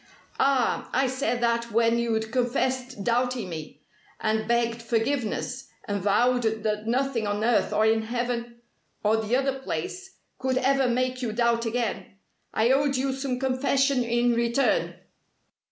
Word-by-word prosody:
"Ah, 270 -3 +2
I 265 - +3
said 260 -1 -1
that 235 0 0
when 230 +1 +3
you'd 220 -2 -1
confessed 250 -1 -1
doubting 240 -3 0
me, 160 -3 -8 0.4
and 220 0 0
begged 235 0 +1
forgiveness, 245 +2 -1 0.2
and 205 -1 -2
vowed 245 +6 +3
that 215 -1 -1
nothing 250 -2 0
on 205 +1 -1
earth 230 -2 +2
or 215 - +2
in 220 0 +3
heaven 235 +1 -3 0.4
or 215 +1 +3
the 220 +2 0
other 270 0 0
place 365 - -5 0.2
could 260 0 0
ever 265 0 +2
make 255 +1 0
you 240 -3 -2
doubt 235 +1 +1
again. 225 -4 -3 0.3
I 230 +3 +2
owed 275 0 +2
you 265 +1 0
some 265 -1 -2
confession 265 0 +1
in 240 +1 +2
return." 235 +3 +1
240 Hz, 145 wpm, -26 LUFS, 225-260 Hz, 0.4 s, I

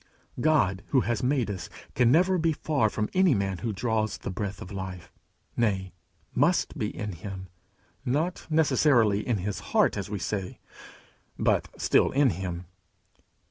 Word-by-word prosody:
God 120 -11 +2
who 130 - +3
has 120 +1 -1
made 125 -4 +1
us 95 - -6 0.2
can 120 -1 +4
never 180 +4 +4
be 165 0 +2
far 140 -7 +1
from 105 +1 -2
any 185 -6 +4
man 95 -2 -1
who 110 +5 -2
draws 110 +1 -1
the - - -5
breath 100 +1 -4
of 90 - -9
life 95 -3 -7 0.4
nay, 95 -5 0 0.4
must 165 +8 +2
be 110 -8 -1
in 105 -1 -5
him; 95 +1 -8 0.5
not 150 +7 -1
necessarily 140 -9 +3
in 120 -2 0
his 100 +2 -3
heart, - - +2
as 100 -1 -4
we 105 - -3
say, 95 0 -3 0.8
but - - +2
still - - +3
in 135 -2 +4
him. 90 0 -5
110 Hz, 155 wpm, -27 LUFS, 95-140 Hz, 0.8 s, can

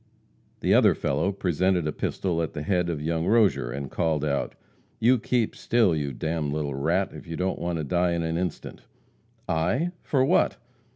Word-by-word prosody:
The - - +3
other - - +5
fellow 100 - 0
presented 95 -2 0
a 75 - 0
pistol 85 0 -2
at 80 - -3
the 75 -2 -4
head 90 +1 +1
of 75 -3 -3
young 80 +1 -1
Rozier, 105 - +3
and 70 +1 -5
called 80 -3 0
out: 70 -2 -1 0.4
"You 120 +2 +4
keep 120 -1 0
still, 115 -8 +2
you 70 -2 -2
d - - -7
d 80 +1 -1
little 75 -1 -2
rat, 85 +8 0
if - - -11
you 85 - -5
don't 95 +1 -1
want 85 0 -2
to 80 - -2
die 85 +4 +1
in 85 -1 -1
an 80 0 -2
instant." 90 -1 -4 0.7
"I? 90 - 0
for 130 -2 +1
what?" - - +2
85 Hz, 190 wpm, -26 LUFS, 75-95 Hz, 0.7 s, other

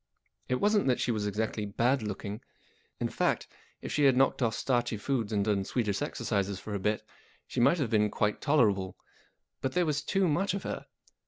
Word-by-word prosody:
It 125 - +2
wasn't 205 +6 +2
that 125 - +2
she 120 - +1
was 105 -2 -1
exactly 105 +1 -2
bad 120 +6 +1
looking. 105 0 -5 0.6
In - - 0
fact, - - 0 0.4
if - - -5
she 150 - +2
had 130 -2 +5
knocked 135 +1 +3
off 115 -3 +1
starchy 120 -3 0
foods 115 0 -1
and 100 -2 +1
done 100 -2 +1
Swedish 105 -2 -1
'exercises 100 -1 -1
for 105 +2 -7
a 100 - -1
bit, 105 +3 0 0.4
she - - -4
might 120 +8 +5
have 135 -8 -1
been 105 -1 +3
quite 105 0 0
tolerable. 105 -11 +2 0.6
But 130 - -1
there 180 +3 +2
was 150 -2 0
too 195 +3 +1
much 180 +5 +1
of 195 - -4
her. - - -5
115 Hz, 195 wpm, -30 LUFS, 105-140 Hz, 0.6 s, had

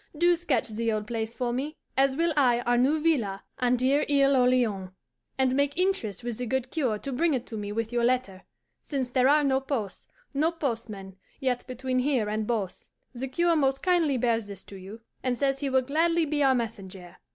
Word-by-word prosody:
Do 345 +2 +4
sketch 305 -10 -1
the 225 +1 -1
old 215 -1 -2
place 225 0 -4
for 245 -2 -1
me 290 +5 -3 0.2
(as 270 0 +3
will 330 +2 +1
I 245 -5 +3
our 245 0 +1
new 270 +6 +3
villa 240 -12 0 0.2
on 250 0 +3
dear 265 +4 +2
Isle 280 -1 +4
Orleans), 245 -7 +2 0.5
and 260 -1 +2
make 285 +1 +1
interest 360 - -1
with 240 -1 -4
the 250 - -3
good 260 +1 -2
cure 255 -10 0
to 275 - -6
bring 315 +3 +2
it 250 -1 -3
to 225 - -8
me 205 -1 -4
with 225 +2 -3
your 240 -1 +1
letter, 240 -6 0 0.4
since 265 -4 -3
there 255 0 +3
are 300 +1 +5
no 265 -1 +2
posts, 260 -8 -4 0.3
no 305 +4 +2
postmen, 225 - -5 0.2
yet 255 -3 -1
between 255 0 -2
here 250 -5 +1
and 215 0 -2
Beauce. 210 -6 -3 0.2
The 260 +2 -4
cure 340 +6 +2
most 270 -3 +1
kindly 335 -7 +2
bears 230 -3 0
this 200 -2 -8
to 200 - -12
you, 195 +4 -10 0.2
and 250 -1 -1
says 275 0 0
he 280 -1 -1
will 260 -1 +2
gladly 330 +5 +2
be 295 0 -1
our 270 -2 +4
messenger. 195 -6 -5
255 Hz, 210 wpm, -27 LUFS, 225-280 Hz, 0.5 s, are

